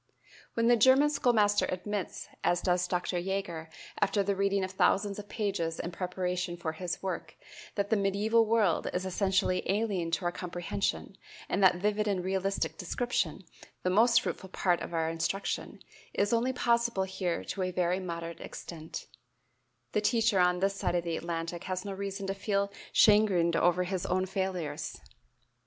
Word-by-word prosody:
When 230 - +2
the 240 - +6
German 260 +6 +5
schoolmaster 215 -7 +3
admits, 195 +2 -4 0.2
as 175 - +2
does 180 -1 +2
Dr. 180 0 -1
Jaeger, 175 -3 -3 0.3
after 200 - +2
the 200 0 0
reading 200 0 +1
of 185 - -3
thousands 200 +1 +2
of 205 -1 -9
pages 190 -7 -2
in 175 - -3
preparation 180 0 -2
for 165 -2 -3
his 175 +2 -5
work 190 - -4 0.4
that 200 +1 -1
"the - - +5
medieval 205 +3 +3
world 215 -6 +2
is 185 +1 -1
essentially 190 0 +1
alien 195 -4 0
to 170 +2 -1
our 175 - +2
comprehension, 180 +2 -3 0.3
and 195 - 0
that 185 -1 +6
vivid 210 +3 0
and 190 -3 0
realistic 195 +1 -1
description 195 -3 -1 0.4
the 180 - +1
most 230 +4 +5
fruitful 190 - -5
part 180 -2 +1
of - - -5
our 165 -1 0
instruction 165 +4 -3 0.3
is 205 +3 +2
only 235 +3 +2
possible 235 -4 +1
here 185 -2 -2
to 195 - -4
a 185 - 0
very 180 0 0
moderate 170 -2 -5
extent," 160 -2 -7 0.9
the 210 - +1
teacher 225 -2 +3
on 180 0 +4
this 195 +1 +2
side 190 -2 -1
of 175 - +1
the 170 -1 -2
Atlantic 170 +1 -4
has 185 0 -3
no 200 - -4
reason 195 0 -4
to 195 - -1
feel 200 0 -1 0.2
chagrined 195 -6 +5
over 175 +2 +3
his 185 0 -3
own 185 +1 +1
failures. 190 -4 -3
190 Hz, 165 wpm, -30 LUFS, 175-205 Hz, 0.9 s, the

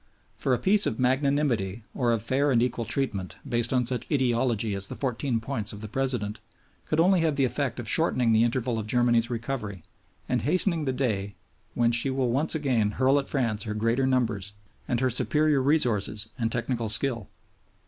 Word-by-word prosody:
For - - -2
a 125 - +3
Peace 200 - +3
of 110 - -2
magnanimity 130 -6 0
or 120 -2 0
of 115 -3 -1
fair 135 +5 +1
and 125 -4 +3
equal 120 -2 -2
treatment, 110 -6 -2
based 120 -1 0
on 125 -2 +1
such 125 +3 -2
"ideology" 120 -5 +1
as 100 0 -1
the - - -7
Fourteen 130 -2 -2
Points 110 -3 -4
of 105 - -9
the 110 - -6
President, 120 -3 -2 0.5
could 155 - 0
only 185 +2 +4
have 160 -3 +1
the 135 -1 +2
effect 130 -1 -2
of 120 - -5
shortening 125 -4 +2
the 110 - +4
interval 120 -1 -1
of 105 - -6
Germany's 120 0 +2
recovery 115 -6 -5 0.4
and - - 0
hastening 170 - +1
the 130 - 0
day 105 -7 -2 0.4
when 120 -1 +2
she 120 +3 +2
will 130 -2 0
once 145 +6 +3
again 130 -9 +1
hurl 135 +2 +3
at 135 - -5
France 115 -6 -1
her 105 +1 -4
greater 115 +5 +1
numbers 110 -6 -1 0.3
and 120 0 0
her 130 -1 +1
superior 150 +3 +2
resources 110 -7 0
and 115 -1 -2
technical 120 -1 -2
skill. 115 -1 +3
120 Hz, 190 wpm, -26 LUFS, 110-135 Hz, 0.5 s, only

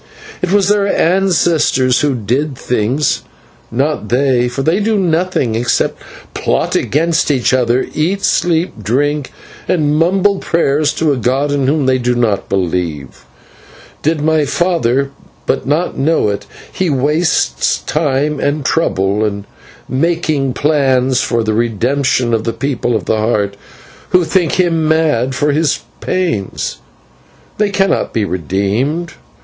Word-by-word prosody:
It 180 - -1
was 200 -1 +3
their 205 -1 +2
ancestors 165 -9 +2
who 145 -3 +1
did 130 +6 -1
the - - -17
things, 125 +5 0 0.5
not 135 -2 -1
they, 125 -1 +2
for 135 +3 -3
they 165 +6 +2
do 215 +1 +1
nothing 175 - 0
except 120 +2 0 0.3
plot - - -1
against 165 +3 +1
each 130 -3 +1
other, 125 0 +2
eat, 180 +6 -1
sleep, 165 - 0
drink, 140 +6 -1 0.4
and 150 -4 +1
mumble 190 +5 +2
prayers 150 -3 +1
to 155 -3 +1
a - - -2
god 130 +5 0
in 140 -2 0
whom 145 0 +1
they 130 0 +2
do 125 0 0
not 115 -5 0
believe. 85 -9 -3 0.8
Did 155 0 0
my 155 0 +2
father 140 -5 0 0.3
but - - -1
know 150 -4 +1
it, 100 - -4 0.3
he 185 -2 0
wastes 145 - +1
time 150 -1 0
and 145 -1 -1
trouble 100 - +1
in 100 -1 -2 0.4
making 155 -2 0
plans 130 -3 +2
for 115 -1 0
the 110 0 0
redemption 120 +2 0
of 110 -1 +1
the 115 0 -2
People 120 0 -1
of 105 - -2
the 110 - +1
Heart, 105 -2 0 0.5
who 180 -1 +4
think 165 0 +1
him 165 -4 +1
mad 150 -6 +1
for 145 +2 +1
his 150 -1 +1 0.2
pains. 170 - -2 0.8
They 210 -1 +2
cannot 195 -1 0
be 110 -2 0
redeemed. 100 - -1
140 Hz, 140 wpm, -15 LUFS, 120-160 Hz, 0.8 s, who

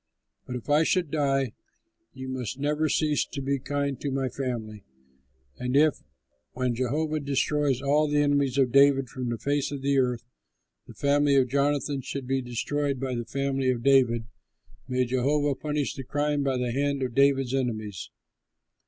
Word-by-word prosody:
But 125 - -4
if 125 - -7
I 145 +1 +4
should 165 -1 +1
die, 135 -5 +1 0.6
you 130 0 -8
must 130 -2 -4
never 150 +2 0
cease 150 +1 +1
to 145 - -7
be 140 0 -1
kind 140 0 -2
to 145 - -2
my 135 -1 -1
family. 115 -6 -5 0.8
And 125 +2 0
if, 155 0 +3 0.5
when 125 -1 -1
Jehovah 150 +6 -1
destroys 140 -1 0
all 150 +2 +3
the 145 0 0
enemies 140 -2 +1
of 130 -3 +3
David 140 -1 +5
from 125 -1 -4
the 120 - -2
face 140 +4 -1
of 140 -2 -5
the 140 0 +2
earth, 125 -2 0 0.6
the - - -12
family 145 0 +2
of 130 -2 +3
Jonathan 140 +1 0
should 135 +1 -5
be 135 +1 0
destroyed 135 +3 -2
by 130 -1 -2
the 120 -1 -3
family 135 +1 -1
of 120 -2 -1
David, 125 -4 +4 0.6
may 125 -1 +1
Jehovah 140 +4 +1
punish 150 +1 -2
the 135 - -7
crime 145 +2 -1
by 135 -2 0
the 125 -1 -1
hand 140 +1 0
of 125 -2 -3
David's 135 -1 +3
enemies." 110 -7 -3
135 Hz, 170 wpm, -27 LUFS, 125-145 Hz, 0.8 s, David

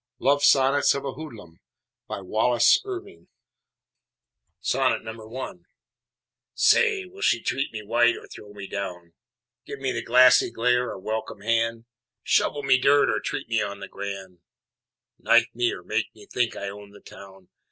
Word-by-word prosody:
LOVE 140 +2 +2
SONNETS 135 +1 +4
OF 140 - -4
A 135 - -2
HOODLUM 115 - -11 0.5
BY - - -5
WALLACE 115 +5 +3
IRWIN 390 0 -8 1.5
I 115 -2 -2 1.0
Say, 430 -5 +3
will 380 +2 -14
she 115 - +2
treat 135 +1 -2
me 110 -2 -7
white, 120 +3 +2
or - - -12
throw 105 - -13
me 100 -1 -9
down, 90 -4 -6 0.5
Give 140 - -6
me 135 -1 -2
the 115 - -3
glassy 125 +2 +5
glare, 125 +1 +1
or - - -6
welcome 110 +1 -5
hand, 115 +1 0 0.4
Shovel 145 - +1
me 135 -1 +4
dirt, 140 +2 +4
or - - 0
treat - - -5
me 115 -2 0
on 100 -1 -4
the 100 - -8
grand, 95 -3 -7 0.8
Knife 120 +1 +3
me, 120 0 +1
or 90 - -8
make 105 +4 -1
me 105 - -15
think 120 -2 -1
I 100 - -5
own 100 +1 -9
the 100 0 -16
town? 95 -2 -15
115 Hz, 155 wpm, -25 LUFS, 100-135 Hz, 1.5 s, glassy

